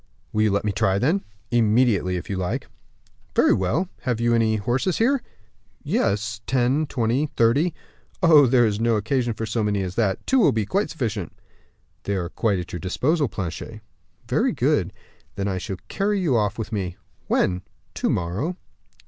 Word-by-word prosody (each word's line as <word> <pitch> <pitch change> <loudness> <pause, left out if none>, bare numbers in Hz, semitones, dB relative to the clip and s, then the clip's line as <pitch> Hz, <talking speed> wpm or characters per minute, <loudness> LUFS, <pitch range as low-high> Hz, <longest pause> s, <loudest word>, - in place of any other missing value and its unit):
"Will 110 - +1
you 110 - +4
let 100 +1 0
me 105 - +1
try, 95 0 +1
then?" 160 - +1 0.3
"Immediately, 110 -5 +3
if 90 - -6
you 100 - -3
like." 90 -1 -2 0.7
"Very - - +5
well. 115 - 0
Have 125 -3 -2
you 120 0 +2
any 110 -1 +3
horses 120 - 0
here?" 260 +4 +2 0.6
"Yes; 105 +2 0
ten, 130 +4 +1
twenty, 125 +3 0
thirty." 140 +9 +3 0.5
"Oh, 155 -5 +7
there 120 -1 +4
is 105 -1 0
no 115 0 +2
occasion 120 +2 0
for 110 - -3
so 110 +1 -1
many 100 -2 0
as 90 -1 -4
that, 95 -3 0
two 265 - +3
will 210 - +5
be 110 -2 0
quite 200 - 0
sufficient." 110 - -3 0.7
"They 100 - 0
are 90 -3 -2
quite 105 0 0
at 90 -1 -6
your 90 - -3
disposal, 140 - +1
Planchet." 100 +3 -6 0.5
"Very - - +1
good; - - +1 0.4
then 100 0 -2
I 95 -2 -1
shall 95 +1 -5
carry 205 +1 0
you 160 -9 +1
off 105 -2 +1
with 110 -1 -5
me." 95 -4 -3 0.3
"When?" 90 -1 +1 0.3
"To - - -1
morrow." 100 - -1
110 Hz, 175 wpm, -23 LUFS, 100-130 Hz, 0.7 s, Oh